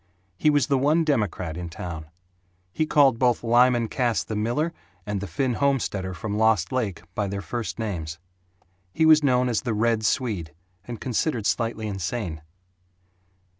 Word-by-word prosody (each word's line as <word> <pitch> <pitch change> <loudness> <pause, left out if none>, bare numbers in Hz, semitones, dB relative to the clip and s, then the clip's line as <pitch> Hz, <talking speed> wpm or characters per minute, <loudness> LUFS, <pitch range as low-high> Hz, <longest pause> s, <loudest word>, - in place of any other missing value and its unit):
He 150 - +2
was 145 -2 +3
the 140 -3 +1
one 150 +5 +3
democrat 105 - -1
in 85 0 -5
town. 80 -2 -7 0.7
He 155 - 0
called 135 -6 +4
both 125 -2 +2
Lyman 120 0 +4
Cass 115 - 0
the 110 - -5
miller 120 +10 0 0.3
and 105 -2 -3
the 100 - -4
Finn 125 - -1
homesteader 105 -8 0
from 105 +4 -3
Lost 110 -6 +3
Lake 110 -10 -2
by 105 - -1
their 100 +1 -3
first 120 -2 -4
names. 85 -8 -4 0.8
He 160 - +3
was 155 -1 +7
known 125 -3 +3
as 120 -3 0
"The 120 -4 -2
Red 115 0 +1
Swede," 105 - -1 0.3
and 120 -3 -7
considered 125 -2 -1
slightly 115 -1 -1
insane. 95 -4 -3
115 Hz, 160 wpm, -25 LUFS, 100-130 Hz, 0.8 s, was